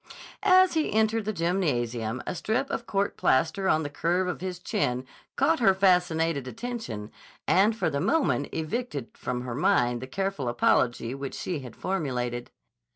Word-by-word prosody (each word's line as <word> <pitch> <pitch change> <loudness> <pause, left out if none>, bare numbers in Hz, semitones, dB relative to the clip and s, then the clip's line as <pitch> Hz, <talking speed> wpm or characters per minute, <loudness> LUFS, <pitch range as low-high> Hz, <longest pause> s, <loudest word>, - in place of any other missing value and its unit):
As 370 -2 +5
he 315 -2 0
entered 220 0 +2
the 215 - 0
gymnasium 130 - -1
a - - -2
strip 220 +9 -1
of 235 - -3
court 200 0 -1
plaster 165 +8 +2
on 155 - +3
the 145 - -3
curve 175 +5 0
of 180 - -3
his 185 -1 -4
chin 130 - -1 0.3
caught 325 -1 +2
her 195 -5 +5
fascinated 165 -7 +2
attention 130 - -5 0.4
and 205 +4 +4
for 220 - 0
the 140 0 -1
moment 270 - +1
evicted 160 - -4
from 125 -1 -3
her 125 -1 -5
mind 120 -2 +2
the 130 - -6
careful 190 -4 -2
apology 120 0 +2
which 135 0 -5
she 175 -5 -3
had 125 -4 -10
formulated. 125 -9 -2
165 Hz, 160 wpm, -27 LUFS, 125-200 Hz, 0.4 s, As